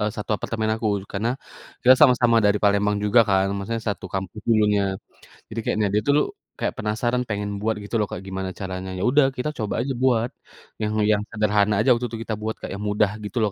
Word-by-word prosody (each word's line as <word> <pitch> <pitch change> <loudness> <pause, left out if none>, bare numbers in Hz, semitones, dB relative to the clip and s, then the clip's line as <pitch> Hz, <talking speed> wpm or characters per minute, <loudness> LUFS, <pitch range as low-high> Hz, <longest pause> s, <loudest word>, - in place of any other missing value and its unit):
E - - 0
satu 105 - -5
apartemen 110 +1 -2
aku, 110 0 -3 0.3
karena 110 +4 -1 0.5
kita 130 +1 +8
sama-sama 125 -4 +5
dari 105 0 +4
Palembang 105 0 +3
juga 105 +3 +5
kan, 95 0 +3
maksudnya 115 +3 -3
satu 95 -2 -5
kampus 95 +2 -4
dulunya. 105 -2 +3 0.7
Jadi 115 +1 -5
kayaknya 105 -1 +1
dia 105 - +3
tulu 145 +1 +4 0.4
kayak - - -1
penasaran 120 +4 0
pengen 105 -1 -2
buat 110 +1 0
gitu 105 +3 -5
loh 105 - +1
Kak, - - -4
gimana 95 0 -4
caranya. 95 -1 -5
Ya 90 - -3
udah 145 +1 +5
kita 140 +5 -1
coba 105 -2 -2
aja 135 +1 -2
buat, 120 -2 +3 0.5
yang 105 0 -1 0.2
yang 105 -1 +2
sederhana 105 -1 +2
aja 130 - +2
waktu 120 +1 -2
tuh 115 - -5
kita 110 - -3
buat 110 +1 -3
Kak, - - -6
yang 100 - -6
mudah 105 -1 +1
gitu 105 +4 -6
loh, 105 - +1
105 Hz, 210 wpm, -23 LUFS, 100-115 Hz, 0.7 s, kita